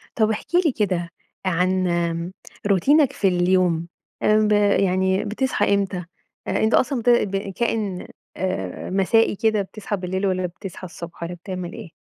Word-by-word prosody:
طب 220 -1 +3
احكِ 220 +10 -4
لي 310 - +4
كده 185 -7 -1 0.4
عن، 185 +1 +1
آمم، 170 0 -1 0.3
روتينك 275 - +4
في 200 - +1
اليوم، 180 -2 +2 0.4
آمم، 215 0 +4
ب - - 0 0.3
يعني 190 0 +2
بتصحى 220 0 0
إمتى؟ 195 -3 -1 0.4
أنت 220 +1 +1
أصلًا 260 0 +2
بت 245 - +2
ب 210 -5 +3 0.2
كائن، 215 -6 -1 0.3
آآ، 185 0 -3
مسائي 195 +4 +3
كده، 220 0 +1
بتصحى 205 +2 -5
بالليل 190 +2 -2
والّا 185 -1 0
بتصحى 180 +1 -8
الصبح 170 -1 -9
والّا 170 +1 -4
بتعمل 180 0 -6
إيه؟ - - -9
190 Hz, 150 wpm, -22 LUFS, 180-215 Hz, 0.4 s, لي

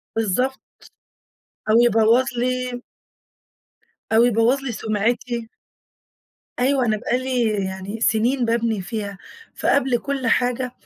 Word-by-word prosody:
بالضبط. 225 +5 0 1.1
أو 220 - +4
يبَوّظ 230 +2 +4
لي 250 0 -2 1.3
أو 230 +2 +6
يبَوّظ 240 +3 +2
لي 255 - -3
سُمْعِتي. 225 +2 -2 1.1
أيوه 260 0 +2
أنا 215 -1 +1
بقى 245 +3 -1
لي 255 -1 -1 0.2
يعني 190 +3 -6
سنين 240 +3 +2
باَبْني 230 -3 0
فيها، 205 -1 -5 0.4
فقبل 265 -3 +2
كل 275 -2 -3
حاجة 250 +1 +1
235 Hz, 105 wpm, -22 LUFS, 220-255 Hz, 1.3 s, أو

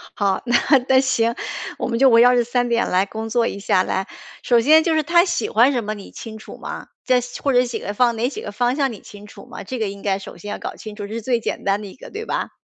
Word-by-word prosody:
好， 195 -2 0
那 240 -1 +1 0.3
那 260 0 +6
行， 235 -3 +1 0.4
我 - - -2
们 235 -2 -1
就 270 0 +6
围 230 -1 +6
绕 245 +1 +6
这 240 - +3
3 245 +1 0
点 235 0 +1
来 185 +2 +2
工 220 +2 -6
作 235 0 +1
一 200 - -5
下 190 -2 +2
来， 190 +1 -2 0.4
首 240 -1 +4
先， 310 +7 +5
就 330 - +1
是 310 - +2
她 340 +3 +4
喜 240 - -1
欢 240 +5 +4
什 245 -4 -1
么 210 +1 -3
你 205 -2 -11
清 220 -2 -9
楚 215 - -11
吗？ - - -7 0.2
在 250 -1 +3 0.2
或 275 - +1
者 250 0 +5
喜欢 235 0 0
哪 235 +2 +1
几 270 - -6
个 205 - -6
方 245 +4 0
向 275 -3 0
你 215 - -9
清 205 0 -13
楚 - - -13
吗？ - - -9
这 255 +5 -5
个 220 - 0
应 200 0 -8
该 195 -1 0
首 195 - -10
先 205 - -8
要 - - -5
搞 - - -6
清 215 -1 -9
楚， 205 -1 -6
这 210 - -8
是 230 - -4
最 240 +1 0
简 - - -4
单 200 +1 0
的 210 - -7
一 190 - -12
个， - - -12
对 435 +2 -6
吧？ - - -2
230 Hz, 305 characters per minute, -21 LUFS, 205-250 Hz, 0.4 s, 那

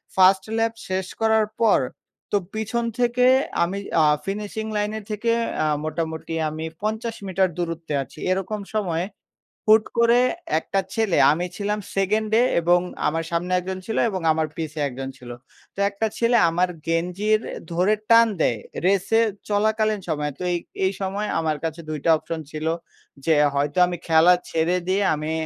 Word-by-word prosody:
1st 190 0 +5
ল্যাপ 225 0 +1
শেষ 185 0 -2
করার 220 -1 +4 0.2
পর 225 - +5 0.5
তো 205 - +3 0.2
পিছন 220 +2 -2 0.2
থেকে 245 +1 +3 0.4
আমি 180 +3 -2 0.2
আ - - +5 0.2
ফিনিশিং 210 +2 -4
লাইনের 210 +1 -2
থেকে 225 +3 0 0.3
আ - - +2 0.2
মোটামুটি 160 +1 -4 0.2
আমি 155 +1 -5 0.2
৫০ 220 +2 -2
মিটার 190 0 +2
দূরত্বে 165 -2 -3
আছি। 145 - -15
এরকম 195 +3 -1 0.2
সময় 175 -5 0 0.6
হুট 215 0 +7
করে 235 +1 +5 0.4
একটা 195 +4 -1
ছেলে, 220 -5 +1 0.2
আমি 175 +4 -1
ছিলাম 210 +1 -1 0.2
2nd 210 +3 +1
এ - - +5 0.2
এবং 175 +1 +4 0.3
আমার 165 +2 -1
সামনে 175 +2 -1
একজন 185 +1 -5
ছিল 225 - -3
এবং 190 -2 -3
আমার 155 0 0
পিছে 155 -1 -5
একজন 135 +1 -6
ছিল। 125 -1 -11 0.4
তো - - -25
একটা 200 +2 -1
ছেলে 235 +1 +3
আমার 180 +2 +1 0.2
গেঞ্জির 180 +6 +1 0.3
ধরে 185 +5 +3 0.2
টান 230 0 +7
দেয় 115 -7 +2 0.3
রেসে 200 +4 +3 0.3
চলাকালীন 215 0 +1
সময়ে। 150 -2 -1
তো - - -6
এই, 175 - +1 0.3
এই 190 - +2
সময় 200 +2 -2
আমার 155 -1 0
কাছে 165 +1 -3
২ 155 -1 -3
টা 165 - +4
অপশন 165 +1 -5
ছিল। 155 0 -5 0.6
যে 160 - +4 0.2
হয়তো 145 +3 0
আমি 175 0 -3
খেলা 165 +2 +6 0.2
ছেড়ে 165 +2 +1
দিয়ে 195 +2 +2
আমি 155 +1 -3
190 Hz, 160 wpm, -23 LUFS, 165-215 Hz, 0.6 s, হুট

